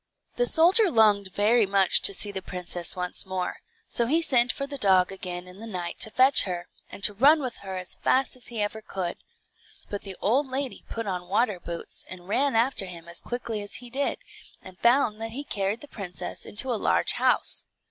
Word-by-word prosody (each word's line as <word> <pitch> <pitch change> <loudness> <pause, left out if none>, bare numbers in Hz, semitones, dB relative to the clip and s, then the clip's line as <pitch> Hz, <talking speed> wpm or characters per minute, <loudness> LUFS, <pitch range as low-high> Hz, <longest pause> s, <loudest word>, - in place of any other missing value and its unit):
The - - +2
soldier 365 +6 +6
longed 210 - +3
very 210 +3 +3
much 195 -1 +3
to 200 - +7
see 205 +1 +3
the 190 -1 -5
princess 180 -2 -3
once 180 -1 -3
more, 185 -1 -4 0.3
so 235 - +1
he 315 +6 +3
sent 245 -4 +4
for 275 - -4
the 280 0 -7
dog 190 -3 +3
again 180 -2 -6
in 180 +2 -12
the 225 - -8
night 180 -5 -5
to - - +1
fetch 260 +4 +4
her, 175 -3 -4 0.2
and 200 - -9
to 210 - +5
run 285 +9 +5
with 255 -5 -4
her 190 -1 -7
as 180 -1 -3
fast 260 0 0
as 250 - -14
ever 220 -1 -2
he 215 - -18
could. 180 -3 -3 0.7
But 205 - -3
the 195 -2 -8
old 265 +7 +1
lady 265 0 -4
put 230 0 -4
on 180 -3 -4
water 210 -1 +1
boots, 170 -1 -6
and 180 -1 -10
ran 265 +5 +1
after 230 -4 +2
him 170 -2 -10
as 170 - -6
quickly 235 -3 -4
as 205 0 -5
he 245 -1 -8
did, 280 +2 -1 0.4
and 185 0 -14
found 235 -3 +2
that 225 0 -5
he 280 +4 -5
carried 200 -3 -2
the 295 - -10
princess 185 - -7
into 245 +4 +1
a 220 - -3
large - - +3
house. - - +2
210 Hz, 210 wpm, -26 LUFS, 185-250 Hz, 0.7 s, to